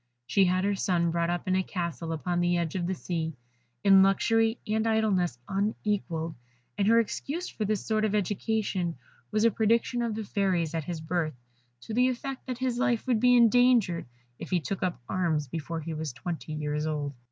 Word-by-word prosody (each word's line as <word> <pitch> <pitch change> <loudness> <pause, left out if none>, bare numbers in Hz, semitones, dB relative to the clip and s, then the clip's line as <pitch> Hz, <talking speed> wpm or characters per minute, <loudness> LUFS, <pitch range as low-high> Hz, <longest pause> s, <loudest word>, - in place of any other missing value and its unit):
She 195 +10 +3
had 185 +1 +1
her 205 +1 +2
son 175 -3 +1
brought 170 0 0
up 175 +1 -2
in 185 - +2
a 190 - +3
castle 170 -3 -4
upon 175 +2 -1
the 175 0 +2
edge 170 -2 -1
of 175 -2 -2
the 190 - -1
sea, 160 -3 -3 0.5
in 195 -1 +7
luxury 225 +4 +3
and 220 +1 +1
idleness 205 - +1
unequalled; 195 -5 -1 0.4
and 200 -1 +1
her 230 +1 +6
excuse 300 - -2
for 215 - -3
this 210 0 -1
sort 215 -1 +1
of 215 -1 +1
education 205 -3 -1 0.3
was 215 - +1
a 230 - +5
prediction 230 +3 +1
of 230 -2 -1
the 220 - -3
Fairies 185 -6 0
at 160 -3 -2
his 170 -3 -4
birth, 160 -2 -1 0.5
to 220 - -7
the 250 +3 +4
effect 260 +2 -5
that 255 -2 -3
his 250 -1 -1
life 245 -3 +1
would 245 -4 +2
be 245 +1 +5
endangered 235 - +4 0.3
if - - -7
he 180 - +2
took 185 +5 -4
up 180 -5 -1
arms 160 -5 0
before 160 +3 -4
he 160 +1 -5
was 155 -3 -4
twenty 160 +3 -5
years 150 0 -2
old. 145 -2 -2
190 Hz, 195 wpm, -28 LUFS, 170-220 Hz, 0.5 s, in